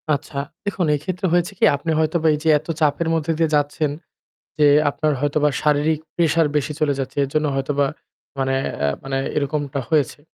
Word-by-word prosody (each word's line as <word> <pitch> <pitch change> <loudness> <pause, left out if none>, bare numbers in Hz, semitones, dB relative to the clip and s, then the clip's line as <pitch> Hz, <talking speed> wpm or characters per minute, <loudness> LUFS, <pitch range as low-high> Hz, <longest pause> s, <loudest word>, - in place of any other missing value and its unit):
আচ্ছা 140 0 -8 0.3
দেখুন, 195 -4 -1
এই - - -4
ক্ষেত্রে 185 +1 -2
হয়েছে 175 +2 +2
কি? - - -4
আপনি 150 +3 -3
হয়তোবা 160 +1 +1
এই - - 0
যে 160 - +2
এত 155 - -19
চাপের 155 +2 +1
মধ্যে 165 0 0
দিয়ে 160 -2 +2
যাচ্ছেন 145 0 0 0.7
যে 150 - +5 0.2
আপনার 155 +1 0
হয়তোবা 145 +1 +2
শারীরিক 150 +1 +2 0.2
pressure 165 -2 +3
বেশি 150 +1 0
চলে 145 -2 +2
যাচ্ছে। 135 0 -4
এর - - -4
জন্য 155 0 +2
হয়তোবা 140 +1 0 0.5
মানে 135 0 0 0.2
অ্যা 70 0 +1
মানে 135 0 -2 0.2
এরকমটা 145 -1 -1
হয়েছে। 150 -2 +1
150 Hz, 180 wpm, -21 LUFS, 140-160 Hz, 0.7 s, যে